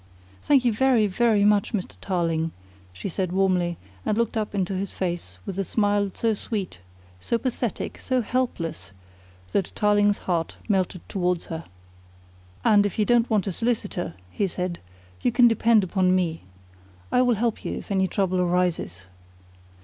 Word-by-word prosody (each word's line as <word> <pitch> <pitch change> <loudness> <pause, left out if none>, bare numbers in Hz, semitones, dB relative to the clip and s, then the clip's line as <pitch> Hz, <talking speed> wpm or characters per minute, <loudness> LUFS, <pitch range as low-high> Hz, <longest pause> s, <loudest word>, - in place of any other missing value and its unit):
"Thank 275 -4 +3
you 235 - +3
very, 245 -1 +3
very 210 +1 +3
much, 210 +2 +3
Mr. 195 -4 -2
Tarling," 165 -3 0 0.4
she 90 - -6
said 185 -1 -2
warmly, 180 -3 +1 0.3
and 210 - 0
looked 235 -1 0
up 215 -2 -2
into 195 -1 0
his 195 +1 -3
face 170 - -4
with 195 0 -4
a - - +2
smile 205 +1 +1
so 225 -1 +1
sweet, 200 - -4 0.4
so 235 - 0
pathetic, 240 -2 -3
so 255 -2 0
helpless, 165 - -2 0.6
that 190 - 0
Tarling's 205 -1 +3
heart 170 -3 -2
melted 190 -4 0
towards 180 -2 -1
her. 160 +1 -5 1.0
"And 205 -1 +6
if 205 -3 -2
you 215 - +3
don't 240 0 +3
want 215 -4 +2
a 195 - -1
solicitor," 205 -5 -2 0.2
he 200 - 0
said, 180 -1 -3 0.4
"you 245 - +2
can 240 +1 +6
depend 225 -1 +4
upon 185 0 +2
me. 170 -3 -1 0.7
I 250 - +4
will 245 -2 +3
help 230 +1 -1
you - - -3
if - - -9
any 190 -1 +2
trouble 185 0 0
arises." 175 - 0
195 Hz, 160 wpm, -25 LUFS, 180-220 Hz, 1.0 s, And